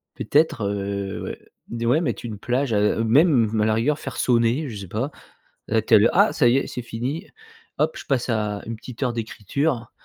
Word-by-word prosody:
peut-être, 145 -5 +1
heu 100 -1 -3
ouais. - - -6 0.3
D 115 0 -4
ouais 135 +7 +3
mettre 120 - -3
une 110 -3 -5
plage, 125 +2 -1
heu, 105 +2 +2
même 115 -3 +3
à - - +3
la 110 - +2
rigueur 145 +7 +1
faire 135 - -7
sonner, 120 +4 +2
je 110 - -7
sais 100 -2 -8
pas. 120 - -3 0.6
À 110 +1 +2
telle 110 -1 +5
heu - - +5
«Ah 200 +4 +4
ça 120 - +3
y 120 - +4
est, - - -1
c'est 125 - -5
fini, 120 +6 -4 0.5
hop, - - +1
je - - -9
passe 130 -4 0
à 105 -3 -1
une 115 - -5
petite 120 +2 -11
heure 125 -2 0
d'écriture», 115 +4 -2
115 Hz, 210 wpm, -23 LUFS, 110-135 Hz, 0.6 s, telle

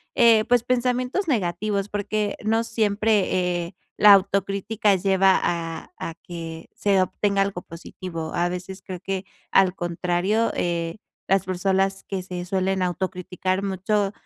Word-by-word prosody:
eh, 230 -3 +6
pues, 245 -1 +3
pensamientos 250 +7 0
negativos, 200 - 0
porque 205 0 -2
no 225 +2 +2
siempre, 205 -5 +1
eh, 175 - -13 0.2
la 210 - +8
autocrítica 200 +2 +2
lleva 190 0 +3
a 165 -1 -3
a 165 - -5
que 165 -2 -7
se 195 -2 +2
obtenga 200 +2 0
algo 195 -2 -1
positivo. 165 -1 -7
A 175 +1 +1
veces 185 +2 -6
creo 185 -1 -7
que, 190 -1 -3 0.3
al 190 -2 +5
contrario, 175 +6 0
eh, 170 0 -1 0.3
las 195 -1 +3
personas 190 +1 0
que 195 -2 -3
se 180 -1 -5
suelen 190 0 0
autocriticar 185 +1 -2
mucho, 195 +1 0
195 Hz, 135 wpm, -24 LUFS, 180-205 Hz, 0.3 s, la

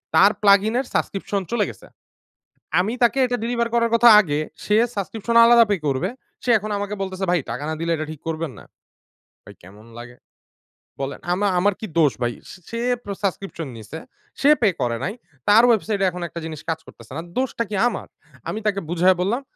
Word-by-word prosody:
তার 200 +2 +7
plug-in 200 +2 +5
এর 270 - -2
subscription 200 0 -2
চলে 235 -3 +1
গেছে। - - -13 0.9
আমি 210 +5 -1
তাকে 240 +3 +3
এটা 245 0 -1
ডেলিভার 235 0 0
করার 230 0 +2
কথা 235 +1 +7
আগে। 150 -7 -1 0.3
সে 210 - +2 0.2
সাবস্ক্রিপশন 220 +3 -3
আলাদা 235 0 +7
পে 205 - +3
করবে। 135 -2 0 0.4
সে 250 - 0
এখন 215 +1 -6
আমাকে 205 +1 -3
বলতেছে, 190 0 -4
"ভাই 180 - +2
টাকা 125 +5 -4
না 160 - -2
দিলে 170 - -2
এটা 155 -1 -4
ঠিক 155 - -9
করবেন 160 -2 -3
না?" - - -13 0.8
ভাই - - -13
কেমন 105 +5 -15
লাগে? 125 +1 -10 0.9
বলেন? 135 +1 -4
আমা 200 +3 0
আমার 200 +2 +2
কি 220 - -5
দোষ 150 -4 +5
ভাই? 120 0 0 0.2
সে - - -11
সে 230 - -4 0.2
প্র 200 - -6
সাবস্ক্রিপশন 190 -5 -3
নিছে। 115 +9 -8 0.4
সে 285 - +5
পে 215 - +5
করে 120 -1 0
নাই। 195 - -2 0.3
তার 215 +3 +7
ওয়েবসাইটে 210 -3 +1
এখন 180 0 -7
একটা 170 - -7
জিনিস 155 -2 -7
কাজ 160 0 -1
করতেছে 115 +1 -15
না। - - -3 0.2
দোষটা 255 -2 -1
কি 210 - -3
আমার? 220 - -4 0.4
আমি 215 - -3
তাকে 200 -1 +1
বুঝায়ে 180 +1 +3
বললাম, 220 +8 0
195 Hz, 195 wpm, -22 LUFS, 160-220 Hz, 0.9 s, তার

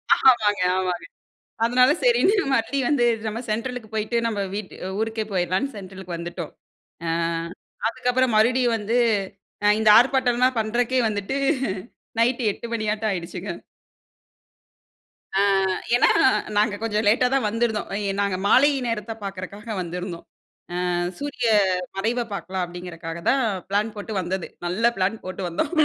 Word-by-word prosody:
ஆமாங்க, 215 -7 +4
ஆமாங்க. 180 -2 -1 0.6
அதனால 250 +3 +5
சரின்னு 475 -5 +4 0.2
மறுபடியும் 265 +2 +1
வந்து 260 -5 +3 0.2
நம்ம 220 +2 -3
சென்ட்ரலுக்கு 230 0 -3
போயிட்டு 220 +2 -1
நம்ப 210 -3 -2
வீட் 205 -2 -5 0.3
ஊருக்கே 220 0 -1
போயிடலான்னு 185 +9 0
சென்ட்ரலுக்கு 185 -2 -7
வந்துட்டோம். 170 -1 -6 0.5
அ - - -1 0.8
அதுக்கப்பறம் 245 0 +1
மறுபடியும் 240 +1 +3
வந்து, 220 +3 -2 0.7
அ - - +4
இந்த 220 - +4
ஆர்ப்பாட்டம்லாம் 255 -1 +3
பண்றதுக்கே 240 +4 +1
வந்துட்டு 210 +5 -2 0.8
நைட்டு 240 +1 +2
8 235 - -8
மணியாட்டம் 215 -1 -1
ஆயிடுச்சுங்க. 180 +1 -4 1.9
ஆ - - +4 0.6
ஏன்னா - - +5 0.5
நாங்க 210 0 +3
கொஞ்சம் 215 -1 0
லேட்டா 245 +4 +4
தான் 265 -5 +2
வந்திருந்தோம். 225 -1 -1
அ - - -1
இ 200 - -1
நாங்க 200 -2 0
மாலை 275 +7 +6 0.2
நேரத்த 225 -1 -3
பார்க்கறக்காக 200 +3 -6
வந்திருந்தோம். 180 0 -6 0.6
"அ - - 0 0.3
சூரிய 280 -5 -2 0.5
மறைவ 235 +4 0
பார்க்கலாம்." 190 -2 -3
அப்படீங்கிறதுக்காக 170 -1 -7
தான் 265 0 +3 0.3
பிளான் 210 +2 0
போட்டு 205 +1 -5
வந்தது. 185 0 -3 0.2
நல்ல 225 +7 +2
பிளான் 195 +4 0
போட்டு 185 +1 -5
வந்தோம். 280 - -2
215 Hz, 130 wpm, -23 LUFS, 190-245 Hz, 1.9 s, மாலை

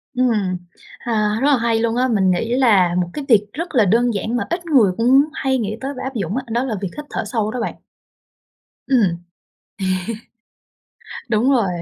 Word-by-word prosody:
Ừm. 215 -8 +1 0.4
À, 215 -2 0
rất 280 - +3
là 280 - +5
hay 230 -1 +1
luôn 230 0 0
á, 255 +1 +2
mình 195 -5 +2
nghĩ 225 +7 0
là 205 -9 +4
một 175 -1 0
cái 295 - -5
việc 210 -4 +4
rất 335 +1 -5
là 225 -4 +5
đơn 235 +4 +2
giản 220 +4 -2
mà - - -1
ít 345 +1 -2
người 250 - +4
cũng 260 +5 +4
hay 265 -3 -1
nghĩ 215 -1 -3
tới 275 +1 -4
và - - -6
áp 265 +1 -5
dụng 200 -1 -2
á, 265 - -1
đó 240 +3 0
là 240 -5 -2
việc 195 -3 -3
hít 295 - -6
thở - - -3
sâu 215 -1 -1
đó 245 +1 -4
bạn. 230 - -3 1.1
Ừm. 195 -10 +2 1.9
À, - - -9
đúng 230 +4 +2
rồi. 235 -8 +2
230 Hz, 205 wpm, -20 LUFS, 210-260 Hz, 1.9 s, là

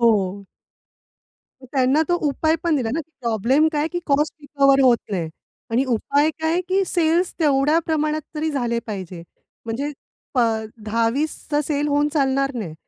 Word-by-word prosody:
हो. 200 -4 +2 1.3
त्यांना 270 +2 +3
तो 350 - +3
उपाय 315 +3 +1
पण 335 -3 +2
दिला 240 -5 -1
ना, 325 - 0
की 320 0 -13
प्रॉब्लेम 240 +7 +2
काय, 300 +1 0
की 350 - -3
कॉस्ट 295 +1 +1
रिकव्हर 275 -2 +3
होत 250 -2 +6
नाही 175 -5 -2 0.4
आणि 245 +4 +2
उपाय 280 +6 +2
काय, 320 +2 +1
की 385 +1 +2
सेल्स 340 +1 +1
तेवढ्या 295 +1 +3
प्रमाणात 310 -1 0
तरी 315 +1 -1
झाले 240 -5 -1
पाहिजे. 185 -5 -6 0.4
म्हणजे 270 +6 -3 0.4
प - - 0 0.5
10-20 230 +7 0
चा 295 0 +2
सेल 295 0 -1
होऊन 290 +1 +2
चालणार 275 -2 +1
नाही, 200 -10 -5
280 Hz, 155 wpm, -22 LUFS, 235-310 Hz, 1.3 s, होत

